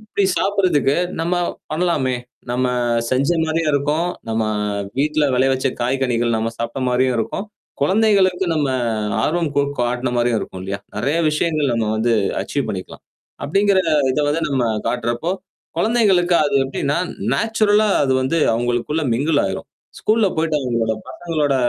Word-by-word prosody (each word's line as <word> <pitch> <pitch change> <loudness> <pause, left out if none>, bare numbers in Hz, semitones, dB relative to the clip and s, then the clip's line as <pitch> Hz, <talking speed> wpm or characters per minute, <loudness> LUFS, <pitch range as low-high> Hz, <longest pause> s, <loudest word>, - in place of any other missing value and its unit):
இப்படி 215 -2 -1
சாப்படுறதுக்கு 185 -8 +2 0.2
நம்ம 170 +2 0 0.4
பண்ணலாமே! 155 -6 0 0.4
நம்ம 125 +1 0 0.4
செஞ்ச 135 +3 +1 0.2
மாரியும் 160 -1 0
இருக்கும், 150 +4 +1 0.2
நம்ம 110 0 0 0.6
வீட்ல 150 +1 +2
விலைய 130 +1 +3
வச்ச 130 +1 0
காய்கனிகள் 120 -2 0
நம்ம 110 +1 -1
சாப்ட்ட 115 +3 -3
மாரியும் 125 +1 +2
இருக்கும், 115 - -3 0.4
குழந்தைகளுக்கு 190 0 +3
நம்ம 145 -3 +1 0.5
ஆர்வம் 165 +3 0
கூட் 140 0 +1
கட்ன்ன 125 +1 -1
மாரியும் 120 -1 +2
இருக்கும் 95 - -7
இல்லயா? 100 +1 -4 0.2
நெறைய 150 +4 0
விஷயங்கள் 150 -3 0
நம்ம 115 -2 0
வந்து 115 +2 +1 0.3
அச்சீவ் - - -3
பண்ணிக்கலாம். - - -7 0.4
அப்டிங்கிற 195 +4 +3 0.3
இத 150 - -2
வந்து 160 +3 0
நம்ம 130 -3 0 0.2
காட்டுறப்போ, 120 +8 -1 0.5
குழந்தைகளுக்கு 190 -5 +3
அது 140 -1 +1
எப்டின்னா 140 +3 -1 0.4
நேச்சுரலா 215 -1 +2
அது 135 -2 +2
வந்து 135 +6 0 0.2
அவங்களுக்குள்ள 120 +6 -1
மிங்குள் 145 +4 +2
ஆயிரும். 95 - -5 0.3
ஸ்கூல்ல 215 -1 +3
போயிடு 160 -1 0
அவங்களோட 115 -4 0 0.2
பசங்களோட 150 -1 -1
145 Hz, 135 wpm, -20 LUFS, 125-175 Hz, 0.6 s, விலைய